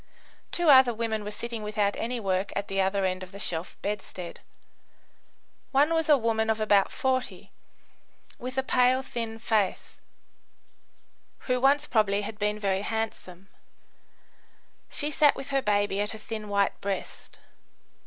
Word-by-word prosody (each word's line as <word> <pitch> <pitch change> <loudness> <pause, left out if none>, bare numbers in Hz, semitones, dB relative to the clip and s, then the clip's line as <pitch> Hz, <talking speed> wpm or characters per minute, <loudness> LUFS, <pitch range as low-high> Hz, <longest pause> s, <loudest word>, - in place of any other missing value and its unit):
Two 345 -3 +4
other 260 -3 +7
women 220 -1 -2
were 205 - -5
sitting 230 +2 -5
without 210 -1 0
any 240 +1 -2
work 190 -2 -1
at 200 0 -2
the 195 0 +1
other 195 0 +1
end 185 0 -1
of 185 -1 -9
the 200 - -9
shelf 170 -3 -4
bedstead. 195 -4 -5 1.3
One 290 +4 +3
was 325 -1 0
a 295 - +7
woman 225 -2 0
of 220 0 +1
about 205 -2 +3
40, 260 -1 -2 0.9
with 255 +2 -6
a 265 - +2
pale, 255 0 +3
thin 230 -3 -5
face, 220 -4 -1 1.4
who 250 -1 -1
once 285 +2 +4
probably 205 -5 +2
had 215 +1 -7
been 210 0 0
very 195 -2 0
handsome. 200 -4 -4 1.4
She 295 0 0
sat 295 0 +5
with 270 - -7
her 275 -1 +1
baby 205 -2 +1
at 210 - -2
her - - -7
thin, 215 -1 -6
white 200 -1 0
breast. 200 -1 -5
215 Hz, 150 wpm, -27 LUFS, 200-250 Hz, 1.4 s, other